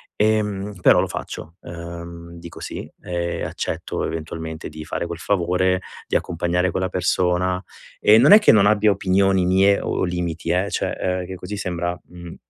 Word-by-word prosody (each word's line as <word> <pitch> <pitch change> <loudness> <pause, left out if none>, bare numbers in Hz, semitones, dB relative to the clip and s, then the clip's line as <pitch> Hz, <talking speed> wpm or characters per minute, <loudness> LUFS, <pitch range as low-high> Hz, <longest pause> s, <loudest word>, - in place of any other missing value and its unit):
Ehm, 105 -2 0
però - - +6
lo - - -1
faccio, 80 +2 -7
ehm, 85 0 -9
dico 85 0 -10
sì. - - -6
Ehm, 85 -1 -3
accetto - - -4
eventualmente 80 0 -5
di 80 0 -9
fare 85 - -3
quel 85 -1 -5
favore, 90 0 +1 0.3
di - - -2
accompagnare 85 +2 0
quella 95 0 -1
persona. 90 0 +1 0.4
E 105 +1 +6
non 140 - +6
è 210 - +11
che 210 - +6
non 100 -1 +5
abbia 105 0 +4
opinioni 95 -1 +2
mie 95 +2 +4
o - - -1
limiti 85 -2 -3
eh, 95 +3 +1
cioè - - -1
ehm, 90 0 -2
che 95 +1 -7
così 95 +3 -6
sembra, 90 -2 -3
mhmm, 85 -1 -11
90 Hz, 170 wpm, -22 LUFS, 85-95 Hz, 0.4 s, è